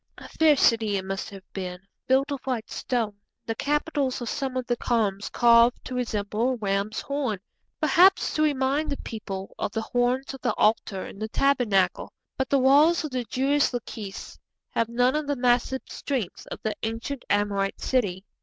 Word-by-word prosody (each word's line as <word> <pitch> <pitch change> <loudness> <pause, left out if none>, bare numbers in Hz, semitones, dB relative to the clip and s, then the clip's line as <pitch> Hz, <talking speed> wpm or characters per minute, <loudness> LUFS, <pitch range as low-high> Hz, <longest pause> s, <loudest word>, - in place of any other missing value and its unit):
A - - -10
fair 315 -2 +4
city 225 -5 +3
it 190 - -4
must 195 +2 -4
have 195 -2 -11
been, 180 -2 -4 0.3
built 270 +2 +3
of 280 - -2
white 245 -4 -3
stone, 225 -5 -2 0.3
the 225 - -1
capitals 290 0 -1
of 240 -2 -4
some 265 -2 -2
of 255 - -2
the 245 - 0
columns 210 -5 0
carved 235 0 +5
to 255 - -6
resemble 225 0 -1
a - - -2
ram's 200 -1 -1
horn, 280 -7 -2 0.4
perhaps 355 +5 +4
to 310 - 0
remind 290 +1 +1
the 280 - -2
people 195 -3 -6
of - - -2
the 225 -1 -2
horns 250 +4 0
of 270 - -10
the 240 -4 0
altar 210 -3 +1
in - - -10
the 220 0 -3
Tabernacle. 230 -9 +1 0.2
But 265 - -2
the 280 - +4
walls 290 +6 +5
of 300 - -5
the 250 -2 -2
Jewish 275 +5 +1
Lachish 220 -4 -6 0.3
have 230 0 0
none 245 +3 +2
of 305 -1 -1
the 285 - 0
massive 245 +1 +2
strength 255 -10 -4
of - - -6
the 220 - 0
ancient 230 +4 -4
Amorite 200 -1 0
city. 200 -7 0
245 Hz, 180 wpm, -26 LUFS, 210-270 Hz, 0.4 s, carved